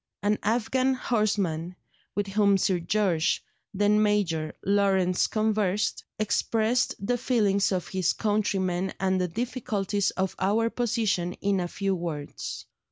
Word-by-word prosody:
An 210 +1 +2
Afghan 255 +4 +1
horseman, 195 -8 -1 0.4
with 205 - 0
whom 200 0 +3
Sir 185 -1 +1
George 175 -2 +1 0.3
(then 205 +1 +3
Major) 180 -7 0
Lawrence 195 -2 +2
conversed, 215 -2 0
expressed 220 +3 +1
the 245 +5 -1
feelings 205 -6 +2
of 185 -2 -2
his 185 -2 +1
countrymen 195 -4 0
and 190 -1 +1
the 180 - +1
difficulties 210 -2 -1
of 190 0 -2
our 220 +4 +1
position 215 -7 0
in 200 -1 0
a 175 - -1
few 195 +2 -1
words. 165 -5 -5
200 Hz, 125 wpm, -27 LUFS, 185-215 Hz, 0.4 s, whom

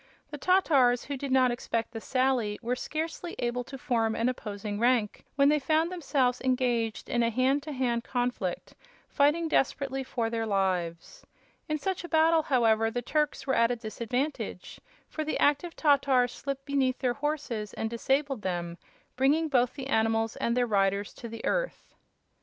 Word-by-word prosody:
The 295 - -5
Tatars, 275 -9 +3
who 285 - -4
did 275 0 -5
not 260 -1 +4
expect 230 -1 -2
the 225 -2 -6
sally, 255 -5 0
were 245 +2 0
scarcely 320 +5 -4
able 240 +1 -1
to 270 - -8
form 230 -5 0
an 230 +2 +1
opposing 205 -4 -5
rank 235 -3 +1
when 280 0 +5
they 300 0 +3
found 315 +4 +1
themselves 275 -8 0
engaged 245 -4 0
in 240 - 0
a 230 - +2
hand 260 +5 +2
to 310 +1 -7
hand 245 -4 -1
conflict, 245 -8 -3 0.4
fighting 300 +3 +2
desperately 270 -2 0
for 230 -3 -2
their 225 -1 -2
lives. 190 - -1 0.5
In 305 - 0
such 370 +4 -3
a 345 - -7
battle, 320 0 +4
however, 225 -6 +2
the 245 +2 -3
Turks 300 +1 -1
were 265 - 0
at 230 -1 +4
a 245 - 0
disadvantage, 240 +5 -4 0.3
for 310 - -4
the 310 - -2
active 295 +4 +1
Tatars 275 -4 +3
slipped 275 0 -5
beneath 270 -3 +1
their 250 -2 0
horses 280 -8 -3
and 225 - -2
disabled 270 +2 -1
them, 175 -2 -3 0.4
bringing 295 +5 +2
both 250 -3 +2
the 275 -2 -6
animals 225 -3 +1
and 235 +1 0
their 245 - +3
riders 200 -2 +1
to 235 - -9
the 230 0 -7
earth. - - -2
255 Hz, 170 wpm, -28 LUFS, 230-285 Hz, 0.5 s, when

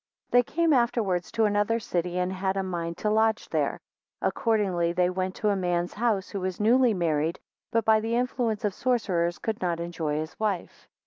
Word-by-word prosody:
THEY 245 - +6
came 325 +6 +1
afterwards 230 -8 +1
to 225 -1 +3
another 205 +2 +2
city, 180 -4 -2
and 180 +1 0
had 190 +1 -1
a 195 - 0
mind 170 -2 -4
to 210 - -1
lodge 220 0 +2
there. - - 0 0.4
2 - - +3
Accordingly 190 -7 0
they 180 0 +2
went 185 0 -2
to 210 - 0
a 200 - +2
man's 175 -2 -1
house, 210 -4 0
who 200 - -4
was 185 -1 -3
newly 235 +1 +4
married 160 -2 0 0.3
but 230 0 +1
by 220 -1 +5
the 225 +2 -1
influence 240 -3 -1
of 205 - 0
sorcerers 185 -9 0
could 220 +4 -3
not 175 -2 -1
enjoy 165 -3 -3
his 155 +2 -5
wife. 205 -5 -3
195 Hz, 195 wpm, -27 LUFS, 175-225 Hz, 0.4 s, THEY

